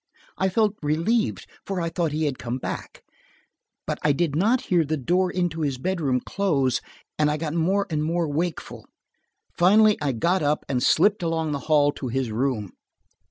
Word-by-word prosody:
I 190 - +1
felt 210 +1 +2
relieved, 165 +10 0 0.2
for 195 -2 -3
I 170 -1 -1
thought 165 -2 -1
he 155 +1 -1
had 140 -3 -2
come 120 +1 -3
back. - - -6 0.8
But - - -3
I 150 - +3
did 145 0 0
not 220 +10 +2
hear 175 -3 +2
the 155 +1 -2
door 180 +7 +1
into 175 -3 -2
his 140 -4 -1
bedroom 140 -5 -1
close, 140 -11 0 0.4
and 150 -1 +3
I 150 - 0
got 155 -1 -3
more 190 +5 +1
and 150 -1 0
more 165 +1 0
wakeful. 160 +3 -4 0.7
Finally 210 +4 +5
I 140 -3 0
got 175 +11 +1
up 150 0 0
and 125 -3 -1
slipped 200 +10 +3
along 165 -2 -1
the 140 - -2
hall 145 -2 +4
to 135 - -6
his 125 -1 -2
room. 110 -4 -1
160 Hz, 180 wpm, -24 LUFS, 140-180 Hz, 0.8 s, Finally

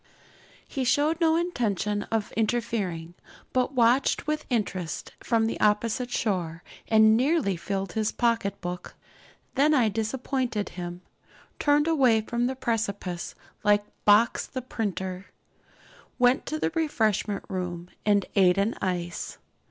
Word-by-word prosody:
He 265 - -3
showed 300 +6 +2
no 320 -1 +4
intention 210 - 0
of 220 -2 -1
interfering, 210 -7 -1 0.4
but 255 +2 +1
watched 245 +2 +3
with 305 0 -2
interest 185 - -2
from 225 -2 +1
the 225 - -2
opposite 220 +4 +1
shore, 175 -8 -2 0.2
and 220 0 +6
nearly 260 - +2
filled 195 +2 -3
his 215 -1 0
pocket 230 -4 0
book. 180 -1 -6 0.6
Then 295 +3 +4
I 240 -5 +4
disappointed 225 +1 -2
him, 175 0 -7 0.6
turned 295 +1 +3
away 260 -9 +4
from 235 +2 -1
the 265 - -2
precipice 200 -8 -3 0.3
like 205 0 +3 0.2
Box 215 +3 +4
the 255 -2 -5
printer, 190 -5 -4 0.9
went 250 +2 +3
to 310 - -2
the - - -1
refreshment 220 - 0
room 180 -2 -4 0.2
and 205 -2 +3
ate 185 -2 +5
an 200 +4 +1
ice. 175 -2 -3
220 Hz, 130 wpm, -27 LUFS, 195-250 Hz, 0.9 s, and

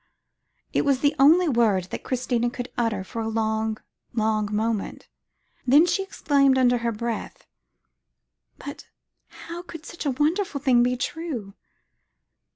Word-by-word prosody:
It - - +3
was 275 -2 +1
the 285 +1 +3
only 330 +6 +6
word 230 - +2
that - - -5
Christina 245 -2 0
could 245 0 -6
utter 225 -5 -1
for 225 +4 -5
a 220 - -2
long, 220 0 -1 0.4
long 215 -2 0
moment; 215 0 -2 0.6
then 290 +6 +7
she 355 +2 0
exclaimed 280 -8 +2
under 245 -1 +3
her 235 0 -1
breath, 230 0 -5 1.1
"But - - -9 0.4
how 340 +1 -9
could 330 -2 -10
such 340 -3 -6
a 260 -2 -1
wonderful 310 +1 0
thing 255 -3 +4
be 250 +1 +1
true? 250 -9 -4
245 Hz, 140 wpm, -24 LUFS, 225-290 Hz, 1.1 s, then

